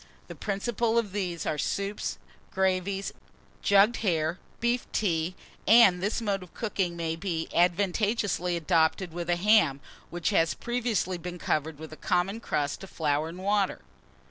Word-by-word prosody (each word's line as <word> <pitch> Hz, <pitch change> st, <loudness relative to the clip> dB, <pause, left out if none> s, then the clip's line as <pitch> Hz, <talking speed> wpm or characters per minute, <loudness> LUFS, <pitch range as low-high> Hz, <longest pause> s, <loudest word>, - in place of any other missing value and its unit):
The -, -, -6 dB
principal 225 Hz, +3 st, -1 dB
of 225 Hz, -4 st, +1 dB
these 180 Hz, -5 st, -3 dB
are 150 Hz, -, -1 dB
soup, 200 Hz, +5 st, -2 dB, 0.5 s
gravies, 190 Hz, +1 st, 0 dB, 0.5 s
jugged 200 Hz, +4 st, +5 dB
hare, 165 Hz, -4 st, 0 dB, 0.2 s
beef 235 Hz, +1 st, 0 dB
tea; 170 Hz, -3 st, 0 dB, 0.3 s
and 195 Hz, -5 st, +7 dB
this 205 Hz, +5 st, 0 dB
mode 200 Hz, -3 st, 0 dB
of 180 Hz, -, -13 dB
cooking 190 Hz, -6 st, -2 dB
may 165 Hz, -1 st, -2 dB
be 165 Hz, -2 st, -3 dB
advantageously 180 Hz, 0 st, +1 dB
adopted 165 Hz, +1 st, +1 dB
with 175 Hz, 0 st, -4 dB
a 175 Hz, -, +3 dB
ham, 175 Hz, -7 st, +4 dB, 0.3 s
which 175 Hz, +3 st, -1 dB
has 165 Hz, -5 st, +2 dB
previously 230 Hz, -7 st, -1 dB
been 180 Hz, +1 st, -6 dB
covered 155 Hz, -2 st, -1 dB
with 155 Hz, +1 st, -9 dB
a -, -, -10 dB
common 190 Hz, +3 st, 0 dB
crust 145 Hz, -5 st, -2 dB
of 195 Hz, -, -9 dB
flour 150 Hz, 0 st, 0 dB
and 170 Hz, -, -9 dB
water. 200 Hz, -1 st, +1 dB
185 Hz, 150 wpm, -28 LUFS, 170-205 Hz, 0.5 s, and